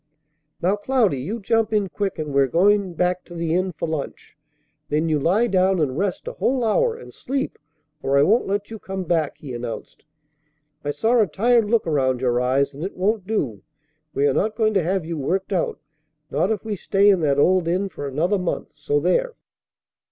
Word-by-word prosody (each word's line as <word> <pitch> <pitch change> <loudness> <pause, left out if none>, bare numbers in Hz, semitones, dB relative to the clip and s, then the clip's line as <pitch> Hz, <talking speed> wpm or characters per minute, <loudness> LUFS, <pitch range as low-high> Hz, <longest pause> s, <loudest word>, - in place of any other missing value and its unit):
"Now, 190 +4 +2
Cloudy, 215 - +1
you 200 - -4
jump 225 +1 +1
in 210 -2 +1
quick, 195 +1 -3
and 150 -2 -4
we're 140 -1 +4
going 190 +4 +2
back 180 +1 0
to 175 - -11
the 165 -1 -1
inn 185 +1 +1
for 165 0 -4
lunch. 155 -3 -5 0.5
Then 155 +2 +1
you 155 -1 +2
lie 190 +11 +2
down 190 -3 +2
and 140 -5 0
rest 190 +2 -2
a - - -2
whole 255 -1 0
hour, 455 - +2
and 470 - -12
sleep, 270 +1 -3 0.4
or 140 +1 +1
I 140 - +6
won't 220 +9 +3
let 200 +2 -2
you 220 - -7
come 190 -1 -5
back," 160 -4 0
he 135 -4 -8
announced. 120 -1 -7 0.8
"I 145 - -3
saw 225 +12 +2
a 210 - +3
tired 225 +5 +2
look 230 -1 +2
around 130 -5 +1
your 125 -1 +1
eyes, 135 +3 +1
and 145 +4 -7
it 190 - -5
won't 200 +1 0
do. 130 - -2 0.5
We 140 - +1
are 140 - +2
not 215 +8 0
going 215 -2 +2
to 195 - +3
have 185 0 -1
you 165 -1 -4
worked 190 +8 -1
out, 180 - -1 0.5
not 155 +7 +1
if 220 - -2
we 215 -2 -2
stay 195 +1 +2
in 195 -3 +5
that 140 -3 +2
old 180 +3 +3
inn 185 +4 0
for 145 -6 -6
another 170 +9 0
month. 180 - -3
So 145 -1 0
there!" 455 - +1
185 Hz, 205 wpm, -22 LUFS, 150-210 Hz, 0.8 s, I